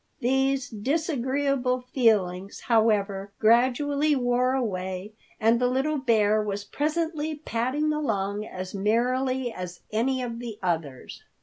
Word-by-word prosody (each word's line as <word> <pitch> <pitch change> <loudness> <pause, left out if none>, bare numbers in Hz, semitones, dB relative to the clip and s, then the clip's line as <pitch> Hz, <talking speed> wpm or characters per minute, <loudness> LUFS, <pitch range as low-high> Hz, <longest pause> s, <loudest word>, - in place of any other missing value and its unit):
These 265 +2 +1
disagreeable 265 0 0
feelings, 205 -7 +1
however, 205 -4 +1
gradually 270 +6 +3
wore 250 0 +1
away, 190 -5 -3 0.3
and 225 +2 +3
the 250 - +4
little 270 +4 0
bear 215 -4 +3
was 205 -1 -3
presently 310 +4 -2
padding 290 +2 -1
along 210 -8 -1
as 185 -3 -7
merrily 245 +4 0
as 180 -1 -7
any 255 +4 0
of 235 -1 -5
the 235 -3 -6
others. 160 -7 -3
240 Hz, 115 wpm, -26 LUFS, 205-270 Hz, 0.3 s, the